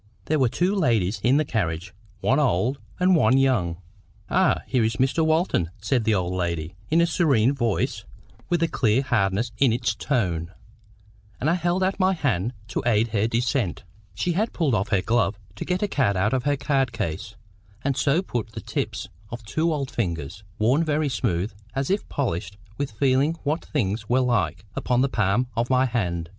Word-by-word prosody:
There 155 Hz, 0 st, +1 dB
were 130 Hz, -3 st, +3 dB
two 180 Hz, -, +1 dB
ladies 115 Hz, -, +1 dB
in 130 Hz, +4 st, +4 dB
the 155 Hz, -, +2 dB
carriage, 90 Hz, -, -2 dB, 0.3 s
one 130 Hz, +3 st, +3 dB
old 130 Hz, 0 st, +1 dB, 0.2 s
and 180 Hz, 0 st, +4 dB
one 135 Hz, -5 st, +4 dB
young. 115 Hz, -11 st, +2 dB, 0.5 s
"Ah, -, -, +3 dB
here 125 Hz, -3 st, +1 dB
is 110 Hz, 0 st, 0 dB
Mr. 135 Hz, +8 st, +1 dB
Walton!" 160 Hz, -, +1 dB
said 110 Hz, +3 st, 0 dB
the 110 Hz, -1 st, +3 dB
old 90 Hz, -1 st, -1 dB
lady, 85 Hz, -2 st, -2 dB, 0.2 s
in 165 Hz, +2 st, +4 dB
a -, -, +5 dB
serene 140 Hz, -8 st, +3 dB
voice, 120 Hz, -6 st, -1 dB, 0.5 s
with 170 Hz, -1 st, +2 dB
a -, -, +3 dB
clear 120 Hz, -3 st, +1 dB
hardness 100 Hz, -1 st, 0 dB
in 135 Hz, -4 st, +5 dB
its 115 Hz, -1 st, 0 dB
tone; 90 Hz, -, -1 dB, 0.9 s
and 150 Hz, +6 st, +1 dB
I -, -, +3 dB
held 175 Hz, +1 st, 0 dB
out 190 Hz, +1 st, 0 dB
my 190 Hz, 0 st, +3 dB
hand 120 Hz, -, 0 dB, 0.2 s
to -, -, -2 dB
aid 115 Hz, -1 st, +2 dB
her 110 Hz, 0 st, +1 dB
descent. 120 Hz, -, -1 dB, 0.3 s
She 175 Hz, -, 0 dB
had 210 Hz, +7 st, 0 dB
pulled 155 Hz, -7 st, +1 dB
off 100 Hz, -2 st, +1 dB
her 100 Hz, -4 st, +1 dB
glove 115 Hz, -3 st, +1 dB, 0.2 s
to -, -, -5 dB
get 180 Hz, +2 st, -1 dB
a -, -, +2 dB
card 120 Hz, -, +1 dB
out 105 Hz, +5 st, +1 dB
of 130 Hz, -1 st, 0 dB
her 145 Hz, -1 st, +2 dB
card 135 Hz, -3 st, +1 dB
case, 100 Hz, -9 st, -4 dB, 0.5 s
and 140 Hz, -1 st, 0 dB
so 155 Hz, +8 st, +2 dB
put 115 Hz, -, -4 dB
the 110 Hz, -, -6 dB
tips -, -, -3 dB, 0.2 s
of 120 Hz, 0 st, -7 dB
two 160 Hz, +9 st, 0 dB
old 140 Hz, -4 st, -2 dB
fingers, 85 Hz, -, -3 dB
worn 125 Hz, +9 st, +3 dB
very 155 Hz, -1 st, 0 dB
smooth, 95 Hz, -4 st, -1 dB, 0.2 s
as 135 Hz, +5 st, -1 dB
if 200 Hz, -, -1 dB
polished 100 Hz, -, -2 dB, 0.2 s
with 140 Hz, +2 st, -2 dB
feeling 135 Hz, +7 st, +2 dB
what 155 Hz, +3 st, -1 dB
things 105 Hz, -6 st, -2 dB
were 130 Hz, +2 st, +3 dB
like, 105 Hz, -8 st, 0 dB
upon 125 Hz, -1 st, +1 dB
the 135 Hz, -, +2 dB
palm 105 Hz, +1 st, +1 dB
of 120 Hz, +1 st, 0 dB
my 130 Hz, 0 st, +4 dB
hand. 90 Hz, -9 st, -2 dB
120 Hz, 190 wpm, -24 LUFS, 100-145 Hz, 0.9 s, a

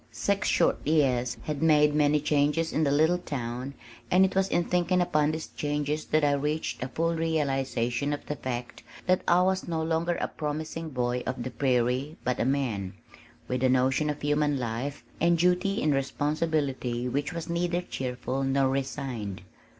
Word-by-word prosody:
Six 200 Hz, 0 st, -1 dB
short -, -, +3 dB
years 130 Hz, -6 st, +2 dB
had 145 Hz, +3 st, -3 dB
made 150 Hz, -2 st, +5 dB
many 150 Hz, 0 st, +3 dB
changes 150 Hz, +3 st, +1 dB
in 160 Hz, -, +2 dB
the 145 Hz, -, +2 dB
little 160 Hz, +5 st, +3 dB
town 130 Hz, -3 st, -5 dB, 0.3 s
and 185 Hz, +1 st, +5 dB
it 190 Hz, -, -2 dB
was 190 Hz, 0 st, +3 dB
in 175 Hz, -, +2 dB
thinking 180 Hz, +1 st, +1 dB
upon 150 Hz, -4 st, +2 dB
these 160 Hz, 0 st, -4 dB
changes 150 Hz, +1 st, -2 dB
that 155 Hz, 0 st, +1 dB
I 145 Hz, -, +4 dB
reached 150 Hz, +2 st, -1 dB
a -, -, -2 dB
full 165 Hz, +5 st, 0 dB
realization 140 Hz, -5 st, 0 dB
of 145 Hz, -, -4 dB
the 150 Hz, -, -3 dB
fact 125 Hz, -3 st, -5 dB, 0.2 s
that 185 Hz, 0 st, +3 dB
I 175 Hz, +1 st, +5 dB
was 190 Hz, 0 st, 0 dB
no 165 Hz, -2 st, -1 dB
longer 165 Hz, +2 st, 0 dB
a -, -, -1 dB
"promising 155 Hz, +2 st, -4 dB
boy" 125 Hz, -2 st, -1 dB
of 130 Hz, -1 st, -3 dB
the 130 Hz, -, -5 dB
prairie 125 Hz, +3 st, 0 dB
but 125 Hz, 0 st, -1 dB
a -, -, +1 dB
man, 120 Hz, -9 st, -1 dB, 0.5 s
with 125 Hz, 0 st, -2 dB
a 130 Hz, -, +4 dB
notion 130 Hz, +4 st, +2 dB
of 150 Hz, -1 st, -4 dB
human 145 Hz, -1 st, +2 dB
life 125 Hz, +2 st, -4 dB, 0.2 s
and 170 Hz, +1 st, +3 dB
duty 180 Hz, +3 st, +2 dB
and 150 Hz, -1 st, +3 dB
responsibility 140 Hz, -3 st, -1 dB
which 140 Hz, +3 st, -1 dB
was 170 Hz, -1 st, -5 dB
neither 175 Hz, +1 st, -1 dB
cheerful 130 Hz, -2 st, -3 dB
nor 135 Hz, 0 st, +2 dB
resigned. 130 Hz, -8 st, -3 dB
145 Hz, 175 wpm, -28 LUFS, 130-160 Hz, 0.5 s, made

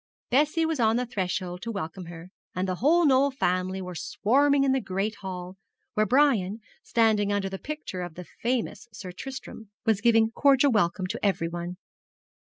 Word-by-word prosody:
Bessie 305 Hz, +5 st, +3 dB
was 320 Hz, -3 st, -1 dB
on 220 Hz, -1 st, +3 dB
the 250 Hz, +1 st, 0 dB
threshold 185 Hz, -4 st, -3 dB
to 230 Hz, -, -4 dB
welcome 185 Hz, -3 st, -5 dB
her, 170 Hz, +1 st, -10 dB, 0.2 s
and 185 Hz, +1 st, -1 dB
the 185 Hz, -, 0 dB
whole 325 Hz, -, +4 dB
Knoll 275 Hz, 0 st, +4 dB
family 185 Hz, -7 st, -1 dB
were 180 Hz, 0 st, -6 dB
swarming 275 Hz, -, +2 dB
in 275 Hz, -, +3 dB
the 265 Hz, 0 st, +1 dB
great 195 Hz, +2 st, -2 dB
hall, 185 Hz, -1 st, -7 dB, 0.4 s
where 215 Hz, 0 st, +2 dB
Brian, 225 Hz, -6 st, +3 dB, 0.2 s
standing 215 Hz, -3 st, +2 dB
under 200 Hz, -1 st, 0 dB
the 195 Hz, 0 st, -6 dB
picture 300 Hz, -11 st, -6 dB
of 175 Hz, -3 st, -6 dB
the 180 Hz, -, -8 dB
famous 240 Hz, +2 st, -3 dB
Sir 190 Hz, -3 st, -8 dB
Tristram, 225 Hz, +1 st, -8 dB, 0.2 s
was 220 Hz, -3 st, +2 dB
giving 225 Hz, 0 st, +4 dB
cordial 275 Hz, +2 st, +4 dB
welcome 190 Hz, -4 st, +1 dB
to 185 Hz, -, -5 dB
everyone. 175 Hz, -2 st, -1 dB
210 Hz, 170 wpm, -27 LUFS, 185-260 Hz, 0.4 s, whole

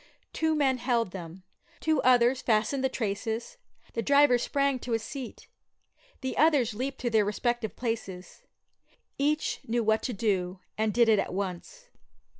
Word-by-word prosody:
Two 320 Hz, -1 st, +1 dB
men 270 Hz, -4 st, +2 dB
held 235 Hz, -5 st, 0 dB
them; 180 Hz, 0 st, -9 dB, 0.4 s
two 315 Hz, -3 st, +1 dB
others 250 Hz, 0 st, +4 dB
fastened 230 Hz, +4 st, +1 dB
the 265 Hz, -, +2 dB
traces; 225 Hz, -, -3 dB, 0.4 s
the 230 Hz, -, -1 dB
driver 280 Hz, -1 st, +5 dB
sprang 275 Hz, 0 st, 0 dB
to 245 Hz, -1 st, -4 dB
his 225 Hz, -1 st, 0 dB
seat; 265 Hz, -2 st, -8 dB, 0.7 s
the 260 Hz, -1 st, -3 dB
others 285 Hz, -7 st, +4 dB
leaped 260 Hz, +5 st, -4 dB
to 240 Hz, -, -1 dB
their 220 Hz, -2 st, +4 dB
respective 220 Hz, +2 st, -2 dB
places. 205 Hz, -6 st, -5 dB, 0.8 s
Each 300 Hz, +2 st, 0 dB
knew 235 Hz, +1 st, 0 dB
what 220 Hz, 0 st, +2 dB
to 250 Hz, -, -3 dB
do, 190 Hz, -3 st, -1 dB, 0.2 s
and 220 Hz, 0 st, 0 dB
did 235 Hz, +1 st, +4 dB
it 215 Hz, -2 st, +4 dB
at -, -, -2 dB
once. 200 Hz, -, -5 dB
240 Hz, 155 wpm, -28 LUFS, 215-270 Hz, 0.8 s, driver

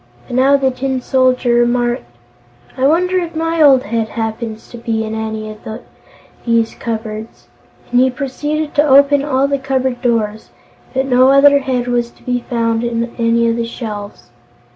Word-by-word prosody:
But 245 Hz, -, -6 dB
now 270 Hz, +2 st, +4 dB
the 265 Hz, -1 st, +1 dB
Tin 260 Hz, +1 st, -2 dB
Soldier 255 Hz, -1 st, +1 dB
remarked: 240 Hz, 0 st, +1 dB, 0.7 s
"I 260 Hz, +1 st, +2 dB
wonder 360 Hz, +4 st, +2 dB
if 340 Hz, -2 st, -5 dB
my 330 Hz, 0 st, -1 dB
old 270 Hz, -4 st, +6 dB
head 225 Hz, +1 st, -2 dB
happens 225 Hz, 0 st, -5 dB
to 240 Hz, -, -9 dB
be 225 Hz, -1 st, -2 dB
in 220 Hz, 0 st, -5 dB
any 220 Hz, -1 st, -4 dB
of 215 Hz, -, -12 dB, 0.8 s
these 230 Hz, -1 st, +1 dB
cupboards," 220 Hz, -1 st, -6 dB, 0.4 s
and 245 Hz, -, +3 dB
he 260 Hz, +1 st, +4 dB
proceeded 295 Hz, +4 st, -3 dB
to 295 Hz, -, +3 dB
open 280 Hz, 0 st, +5 dB
all 275 Hz, -1 st, +1 dB
the 280 Hz, 0 st, -1 dB
cupboard 260 Hz, -2 st, -2 dB
doors. 220 Hz, -3 st, -1 dB, 0.5 s
But 265 Hz, +1 st, +1 dB
no 255 Hz, 0 st, +4 dB
other 280 Hz, +1 st, +6 dB
head 255 Hz, -3 st, -2 dB
was 240 Hz, -1 st, 0 dB
to -, -, -24 dB
be 250 Hz, -1 st, -1 dB
found 230 Hz, -1 st, 0 dB
on 235 Hz, 0 st, -2 dB
any 230 Hz, 0 st, +2 dB
of 230 Hz, 0 st, 0 dB
the 230 Hz, 0 st, -2 dB
shelves. 205 Hz, -, -8 dB
245 Hz, 170 wpm, -16 LUFS, 230-270 Hz, 0.8 s, old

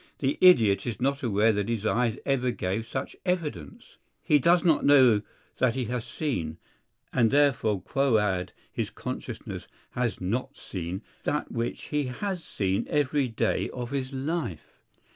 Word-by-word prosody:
the 135 Hz, 0 st, -1 dB
idiot 115 Hz, -, +6 dB
is 115 Hz, -, -3 dB
not 140 Hz, +3 st, 0 dB
aware 110 Hz, -2 st, +3 dB
that 105 Hz, +1 st, -1 dB
his 110 Hz, -2 st, -2 dB
eyes 115 Hz, +1 st, +1 dB
ever 130 Hz, -2 st, +1 dB
gave 110 Hz, -1 st, -2 dB
such 130 Hz, +3 st, -4 dB
evidence. 155 Hz, -, -4 dB, 0.3 s
He 150 Hz, -, +4 dB
does 170 Hz, +4 st, +4 dB
not 160 Hz, -3 st, +4 dB
know 130 Hz, -7 st, +6 dB, 0.4 s
that 130 Hz, -2 st, +2 dB
he 130 Hz, -2 st, -1 dB
has 120 Hz, +1 st, -3 dB
seen 85 Hz, -, -3 dB, 0.6 s
(and 115 Hz, -3 st, +4 dB
therefore 120 Hz, -8 st, +2 dB
quoad 105 Hz, -9 st, +1 dB, 0.2 s
his -, -, -2 dB
consciousness -, -, -6 dB, 0.2 s
has 125 Hz, -2 st, -1 dB
not 125 Hz, +9 st, -2 dB
seen) 90 Hz, +2 st, -5 dB, 0.2 s
that 150 Hz, -, -2 dB
which 115 Hz, 0 st, -3 dB
he 150 Hz, -1 st, +1 dB
has 180 Hz, +8 st, -3 dB
seen 95 Hz, -1 st, -1 dB
every 145 Hz, -1 st, +1 dB
day 115 Hz, -, 0 dB
of 120 Hz, -1 st, -6 dB
his 135 Hz, -1 st, -2 dB
life. 135 Hz, -, -4 dB
125 Hz, 150 wpm, -27 LUFS, 105-140 Hz, 0.6 s, idiot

